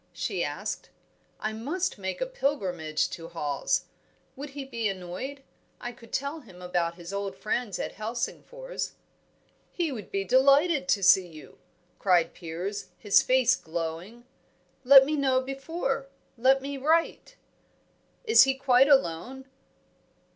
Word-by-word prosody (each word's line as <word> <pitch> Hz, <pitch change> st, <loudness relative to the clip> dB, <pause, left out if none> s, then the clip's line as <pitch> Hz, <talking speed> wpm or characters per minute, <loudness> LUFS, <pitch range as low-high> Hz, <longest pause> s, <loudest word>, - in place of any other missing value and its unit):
she -, -, -2 dB
asked. -, -, -4 dB, 0.5 s
"I 215 Hz, 0 st, -3 dB
must 290 Hz, -, -3 dB
make 190 Hz, -, -4 dB
a -, -, +2 dB
pilgrimage 190 Hz, -, -1 dB
to 165 Hz, -1 st, -7 dB
Hawes. 150 Hz, -5 st, -1 dB, 0.5 s
Would 285 Hz, +2 st, -7 dB
he 275 Hz, -, -4 dB
be 230 Hz, -4 st, -2 dB
annoyed? 195 Hz, +10 st, -6 dB, 0.4 s
I 245 Hz, -, -5 dB
could 230 Hz, -2 st, -17 dB
tell 280 Hz, +4 st, -2 dB
him 190 Hz, -10 st, -15 dB
about 175 Hz, -2 st, -1 dB
his 175 Hz, +2 st, -9 dB
old 200 Hz, -1 st, -3 dB
friends 215 Hz, -2 st, -2 dB
at -, -, -4 dB
Helsingfors 245 Hz, -, -5 dB, 0.4 s
" -, -, -40 dB, 0.3 s
"He 340 Hz, -4 st, -1 dB
would 220 Hz, -6 st, -7 dB
be 195 Hz, 0 st, -1 dB
delighted 275 Hz, -, +4 dB
to 200 Hz, -7 st, +2 dB
see 185 Hz, 0 st, +6 dB
you!" 155 Hz, -3 st, -14 dB, 0.4 s
cried 175 Hz, -4 st, +3 dB
Piers, 180 Hz, +4 st, -5 dB
his 205 Hz, -3 st, +4 dB
face 255 Hz, -1 st, +3 dB
glowing. 170 Hz, +8 st, -6 dB, 0.6 s
"Let 270 Hz, +1 st, +9 dB
me 305 Hz, +2 st, -1 dB
know 265 Hz, -3 st, +2 dB
before 270 Hz, +1 st, -3 dB, 0.3 s
let 265 Hz, +2 st, +3 dB
me 280 Hz, 0 st, -4 dB
write 330 Hz, -, 0 dB, 0.4 s
" -, -, -40 dB
"Is 450 Hz, 0 st, +7 dB
he 270 Hz, 0 st, +1 dB
quite 265 Hz, 0 st, +4 dB
alone?" 265 Hz, -, +1 dB
245 Hz, 140 wpm, -27 LUFS, 185-275 Hz, 0.6 s, Let